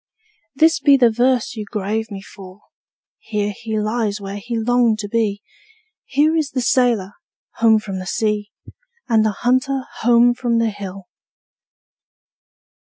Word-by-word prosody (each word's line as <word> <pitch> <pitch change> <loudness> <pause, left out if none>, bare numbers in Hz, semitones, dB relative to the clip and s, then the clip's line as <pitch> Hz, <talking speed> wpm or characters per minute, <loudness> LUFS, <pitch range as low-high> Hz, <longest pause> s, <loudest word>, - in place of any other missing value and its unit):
This 320 +3 +4
be 280 -2 +5
the 240 -3 +4
verse 245 +1 +1
you 215 - -5
grave 210 +2 -3
for 195 -2 -11
me: 205 - -29 0.6
'Here 210 -2 -3
he 220 0 -4
lies 215 -1 -1
where 200 0 -6
he 235 +3 -4
longed 235 -1 +2
to 210 -1 -5
be; 205 -2 -1 0.6
Here 300 +4 +2
is 310 -3 0
the 255 - -2
sailor, 235 -5 +1 0.4
home 225 -1 +5
from 195 -3 -5
the 185 - -7
sea, 210 0 -1 0.6
And 225 -3 +3
the 220 - +2 0.2
hunter 260 +2 +1 0.2
home 240 +1 +5
from 240 -1 -1
the 230 -1 +1
hill.' 195 -2 -8
225 Hz, 145 wpm, -19 LUFS, 205-245 Hz, 0.6 s, be